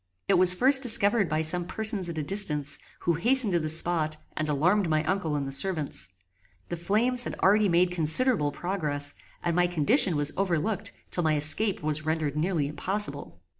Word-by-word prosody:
It - - +1
was 180 0 +5
first 265 +6 +4
discovered 220 -5 +4
by 155 +1 -2
some 175 +3 +1
persons 210 -1 -1
at 165 - -8
a 155 - -3
distance, 150 -5 +1 0.2
who 170 - -1
hastened 230 +5 +1
to 170 - +1
the 155 -1 -4
spot 160 -1 -1 0.2
and 155 0 -4
alarmed 175 +6 0
my 155 -1 0
uncle 165 -2 -3
and 140 -2 -4
the - - -7
servants. 150 - -1 0.6
The 175 - -4
flames 225 +9 +1
had - - -6
already 205 +1 +2
made 175 +1 +1
considerable 170 - +3
progress, 150 -6 -1 0.3
and 170 -1 -2
my 175 0 +1
condition 175 - +1
was 145 0 -1
overlooked 195 +2 -3 0.2
till 175 - -2
my 155 -1 0
escape 160 +6 +3
was 155 0 -2
rendered 155 -2 -3
nearly 155 -2 -2
impossible. 145 - -6
170 Hz, 180 wpm, -25 LUFS, 155-200 Hz, 0.6 s, was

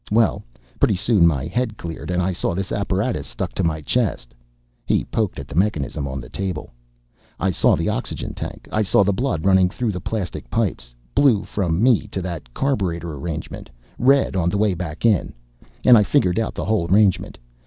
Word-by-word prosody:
Well, 110 +1 +2 0.4
pretty - - +3
soon 95 -2 +4
my 70 -4 0
head 110 +5 -2
cleared, 85 0 -7
and 90 0 +1
I 95 +1 0
saw 85 0 -1
this 95 +1 -3
apparatus 100 - -1
stuck - - -5
to - - -1
my 80 -1 0
chest." 75 - -1 0.5
He - - +1
poked 110 -4 -2
at 70 - -7
the - - -9
mechanism 75 - 0
on 65 0 -4
the - - -9
table. 95 -6 -4 0.7
"I 95 - +1
saw - - +3
the - - -2
oxygen - - -3
tank, - - -7
I 110 - +1
saw 100 0 +4
the 100 +1 +1
blood 110 - -1
running 95 -1 +5
through 110 +3 -2
the 90 -3 -5
plastic 100 -3 -4
pipes 65 - -2 0.2
blue 125 -8 +4
from 90 -1 -1
me 125 -4 +4
to 95 - -4
that 85 -8 -6
carburetor 85 - -1
arrangement, 80 +3 -6 0.3
red 135 -3 +3
on 85 -2 +1
the 100 - -1
way 105 -1 +2
back 85 +1 -5
in 105 -6 +2 0.5
and 125 - +9
I 110 - +6
figured 100 -4 +2
out 115 - -2
the - - -3
whole 105 -7 0
arrangement. 100 -2 +3
95 Hz, 195 wpm, -22 LUFS, 85-110 Hz, 0.7 s, and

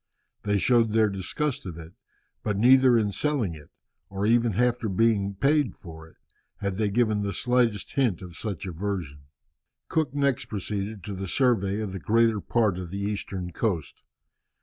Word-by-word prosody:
They 105 0 +1
showed 115 0 +3
their 110 -1 +4
disgust 100 +6 -3
of 85 -3 -7
it, 85 +1 -10 0.5
but 105 -2 -2
neither 125 +2 +6
in 105 -2 +1
selling 130 - 0
it, 75 -2 -13 0.4
or 100 +1 -2
even 115 0 +3
after 120 +1 +1
having - - -3
been 105 -4 +2
paid 140 0 +2
for 80 -2 -11
it, - - -21 0.4
had 100 -2 -3
they 105 -1 +1
given 110 -1 +1
the 100 -1 -2
slightest 120 -5 +1
hint 120 - +1
of 85 -2 -10
such 100 -3 -5
aversion." 85 -6 -4 0.6
Cook 150 -4 0
next 140 -3 +1
proceeded 100 0 -4
to 105 - -5
the 95 0 -5
survey 105 -4 +1
of 105 -3 -4
the 95 - -5
greater 115 +2 +2
part 105 -6 +1
of 90 -2 -6
the 100 - -5
eastern 100 -3 -4
coast. 85 -4 -2
105 Hz, 170 wpm, -26 LUFS, 95-120 Hz, 0.6 s, neither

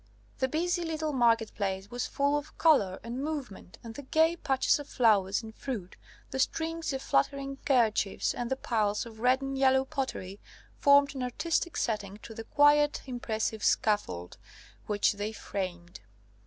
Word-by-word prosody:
The 260 - +2
busy 350 +5 0
little 315 -2 -2
market 230 -3 +2
place 195 -1 -3
was 245 0 -2
full 280 +1 +1
of 295 0 -5
colour 205 - +3
and 240 +4 -4
movement, 275 - -6
and 230 -1 -8
the 285 - -7
gay 320 +4 +2
patches 270 -3 +1
of 290 - -9
flowers 210 -4 +2
and 220 0 -9
fruit, 220 -8 -6 0.4
the 265 - -3
strings 325 +3 -1
of 270 -1 -4
fluttering 275 - 0
kerchiefs, 225 -7 +2
and 240 -1 -4
the 265 - +1
piles 215 -5 -1
of 225 -2 -12
red 255 +3 +2
and 270 0 -3
yellow 265 0 +3
pottery, 205 -8 -4 0.4
formed 280 0 +5
an 265 - -5
artistic 330 +7 -1
setting 210 -3 -2
to 225 - -9
the 225 0 -8
quiet 295 +2 +4
impressive 220 -4 -3
scaffold 90 - 0 0.5
which 205 -1 +2
they 205 +1 -4
framed. 180 -5 -6
250 Hz, 160 wpm, -29 LUFS, 210-285 Hz, 0.5 s, formed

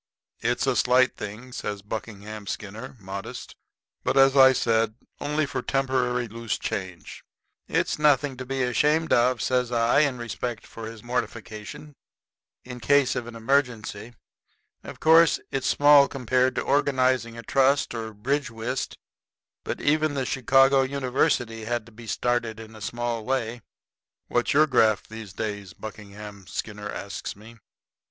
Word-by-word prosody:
"It's 120 +3 0
a 135 -2 +1
slight 125 +1 +3
thing," 110 +5 -8
says 105 -4 -5
Buckingham 105 -1 -7
Skinner, 110 +7 -6
modest, 100 0 -7 0.5
"but, - - 0
as 135 0 +6
I 130 -1 +8
said, 115 -3 +1 0.2
only 150 +1 0
for 130 -1 -3
temporary 125 -2 0
loose 115 0 -3
change." 90 -3 -6 0.4
"It's - - 0
nothing 145 -2 +3
to 130 - -5
be 135 0 -1
ashamed 150 +6 +2
of," 120 0 +3
says 125 -1 +1
I, 115 +2 +3
in 140 -4 +2
respect 120 0 -5
for 115 -1 -8
his 115 -2 -10
mortification; 120 +2 -5 0.7
"in 125 -1 -8
case 140 +1 +3
of 125 -2 -3
an 120 - -9
emergency. 115 -2 -1 0.7
Of - - -9
course, 160 +1 +6
it's 135 - -1
small 145 -1 +6
compared 130 -1 +1
to - - 0
organizing 130 -4 +1
a 115 - -8
trust 135 +3 +2
or 115 -1 -5
bridge 130 +6 -1
whist, 120 +3 -4 0.7
but - - -4
even 155 0 +1
the 135 -2 -1
Chicago 135 +2 +4
University 125 -4 0
had 120 -1 -2
to 115 - -16
be 115 +1 -12
started 120 -1 -1
in 110 0 -11
a 110 - -12
small 120 +1 -3
way." 120 -2 -2 0.7
"What's 120 - +1
your 155 +2 +6
graft 110 -7 +2
these 110 -3 -8
days?" 100 -3 -5
Buckingham 105 -1 -10
Skinner 105 0 -5
asks 100 0 -6
me. 115 +3 -15
120 Hz, 145 wpm, -25 LUFS, 110-135 Hz, 0.7 s, I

